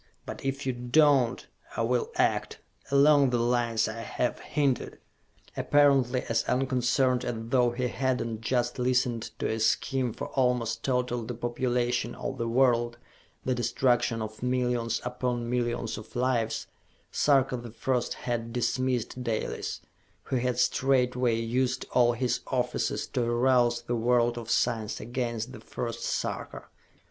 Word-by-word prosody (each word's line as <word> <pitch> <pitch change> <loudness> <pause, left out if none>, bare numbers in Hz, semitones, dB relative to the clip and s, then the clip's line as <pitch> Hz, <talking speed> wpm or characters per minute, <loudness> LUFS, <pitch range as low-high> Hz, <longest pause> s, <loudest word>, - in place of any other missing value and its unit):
But - - -7
if 135 +1 -2
you 130 - 0
do 125 +4 +1
not, 140 -6 +3 0.3
I 115 - +1
will 120 +1 0
act... - - +1 0.3
along 140 0 +5
the 125 - +1
lines 120 -1 +1
I 110 +1 -5
have 125 +1 -2
hinted!" 140 -4 -1 0.6
Apparently 135 -4 +3
as 115 0 +1
unconcerned 130 0 +1
as 120 - -2
though 120 +2 +2
he 125 +1 -2
had 130 0 0
not 115 -1 -4
just 120 +1 0
listened 125 -2 +1
to - - -1
a 110 - -2
scheme 125 +3 +1
for - - -6
almost 125 -3 0
total 125 -2 0
depopulation 120 0 -1
of - - -5
the 115 - -1
world, 120 -1 +2 0.5
the 130 - +1
destruction 120 -1 +1
of 110 0 -8
millions 125 -2 0
upon 125 -1 -2
millions 120 -2 -1
of 110 - -14
lives, 120 -2 0 0.5
Sarka 135 -3 +3
the 120 -1 -7
First 120 +2 -1
had 115 -1 -3
dismissed 125 0 -1
Dalis 115 -3 -3 0.4
who 130 - -1
had 125 0 0
straightway 125 -2 +2
used 125 +2 0
all 120 -1 +4
his 120 0 0
offices 125 -1 -1
to 125 - -1
arouse 120 0 +2
the 120 +1 -2
world 120 0 +2
of 115 -1 -9
science 115 -3 0
against 120 0 -3
the 130 - -9
first 115 -1 -5
Sarka. - - -3
125 Hz, 145 wpm, -28 LUFS, 120-130 Hz, 0.6 s, along